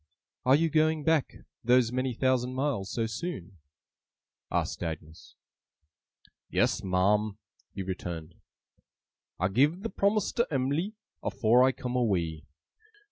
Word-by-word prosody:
'Are 130 - +7
you 165 +3 +3
going 155 0 +2
back 160 -3 +1 0.3
those 120 0 +4
many 130 -1 -1
thousand 130 0 +1
miles, 130 -8 -1
so 115 - -1
soon?' 110 - -5 0.9
asked - - -1
Agnes. 80 -1 -7 1.1
'Yes, - - +1
ma'am,' 100 +3 +2 0.3
he 95 - -5
returned. 85 -3 -5 1.1
'I 95 +2 +2
giv 145 - +2
the 225 - -3
promise 200 +2 +1
to 235 - +1
Em'ly, 145 +9 -1 0.3
afore 120 +3 +3
I 130 +1 +5
come 125 -1 -5
away. 85 -10 0
125 Hz, 120 wpm, -29 LUFS, 95-145 Hz, 1.1 s, Are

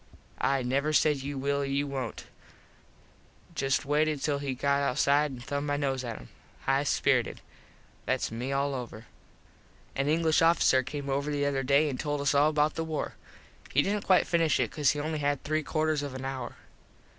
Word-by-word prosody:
I 135 -1 +1
never 140 +5 0
said 150 -1 +4
you 140 +1 -5
will 140 +1 0
or - - -1
you 140 +1 0
wont. 135 -5 -5 1.3
Just 135 +1 0
waited 150 +1 +1
till 145 0 -1
he 140 -2 -3
got 140 +2 +1
outside 140 +2 +2
an 130 -3 -8
thumbed 140 +4 -3
my 145 0 0
nose 135 -2 -1
at 115 -2 -5
him. - - -12 0.3
High 135 +1 +1
spirited. - - +1 0.7
Thats - - 0
me 120 +4 -4
all 140 +1 0
over. 120 -3 -6 0.9
An 140 +1 0
English 160 0 +3
officer 165 -5 +4
came 140 +2 -6
over 140 +2 -1
the 145 -1 0
other 140 -1 0
day 140 +3 +3
an 135 -3 -3
told 145 -1 -2
us 140 0 +1
all 145 +2 +4
about 150 0 +2
the 165 - -3
war. 160 -2 -3 0.6
He 145 - +3
didnt 205 +1 -1
quite 185 -1 +5
finish 165 -3 +2
it - - 0
cause 145 -3 +2
he 145 - 0
only 155 +1 -2
had 145 -1 -1
three 155 +1 0
quarters 155 0 0
of 140 -2 -5
an 130 0 -6
hour. 135 -1 -5
140 Hz, 190 wpm, -29 LUFS, 135-150 Hz, 1.3 s, quite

